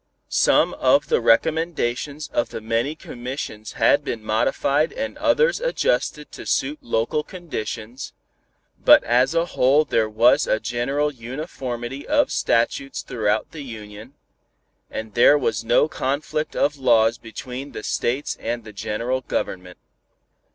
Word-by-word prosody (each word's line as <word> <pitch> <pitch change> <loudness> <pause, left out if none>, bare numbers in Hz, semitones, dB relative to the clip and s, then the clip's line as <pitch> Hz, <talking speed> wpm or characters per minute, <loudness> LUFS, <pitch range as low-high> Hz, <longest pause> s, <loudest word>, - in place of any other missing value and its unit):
Some - - +3
of - - +2
the - - +2
recommendations 150 +1 +1
of 120 - -1
the - - -6
many 115 +7 -1
commissions 125 -6 -7
had - - +3
been 110 -2 -4
modified 140 +8 +1
and 275 +1 -4
others 315 +13 +3
adjusted - - -1
to - - -9
suit 300 +1 0
local 150 - 0
conditions, 130 - -6 0.7
but - - +8
as 125 +6 +2
a 165 0 +3
whole 145 -1 +3
there 110 -5 +1
was 115 +3 +4
a 110 - +2
general 135 +6 -1
uniformity 130 0 -6
of 290 -1 +2
statutes 125 +4 0
throughout 110 -2 -1
the 155 - -8
Union, 110 0 -10 0.7
and 110 -1 -6
there 120 +6 +6
was 115 -5 -1
no 120 +6 +3
conflict 155 +1 -2
of 145 0 +1
laws 115 -2 +3
between 125 +4 -7
the 110 - -7
states 130 +5 -1
and 120 +1 -3
the 110 -1 -11
general 115 +5 -2
government. 90 -7 -4
125 Hz, 135 wpm, -22 LUFS, 115-150 Hz, 0.7 s, but